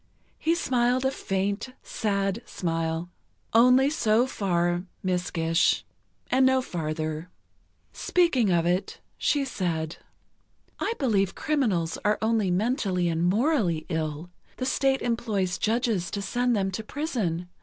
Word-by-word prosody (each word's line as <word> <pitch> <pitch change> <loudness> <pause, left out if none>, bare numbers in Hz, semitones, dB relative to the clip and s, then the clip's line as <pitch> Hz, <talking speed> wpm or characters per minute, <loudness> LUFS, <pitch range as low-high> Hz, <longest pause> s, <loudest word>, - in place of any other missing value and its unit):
He 330 +1 +2
smiled 250 -4 +1
a 265 - +3
faint, 200 +2 -2
sad 200 0 -1
smile. 165 0 -2 0.4
"Only 250 +4 +6
so 225 -5 +3
far, 175 -7 0 0.2
Miss 180 -1 0
Gish, 165 +1 +2 0.5
and 260 +1 +4
no 260 0 +5
farther." 155 -5 -3 0.6
Speaking 310 - +2
of 170 -2 +2
it, 180 +3 -1 0.2
she 285 -2 +1
said: 170 -9 -2 0.8
"I - - 0
believe 200 -8 +1
criminals 220 - 0
are 210 0 +2
only 220 -3 +1
mentally 185 -3 +1
and 165 0 -1
morally 190 - +2
ill. 160 0 -3 0.3
The 255 - -2
State 270 0 +1
employs 215 -6 -1
judges 220 -5 0
to 200 - -3
send 245 +4 +1
them 195 -2 0
to 220 +4 -4
prison. 215 - -2
200 Hz, 125 wpm, -26 LUFS, 175-250 Hz, 0.8 s, Only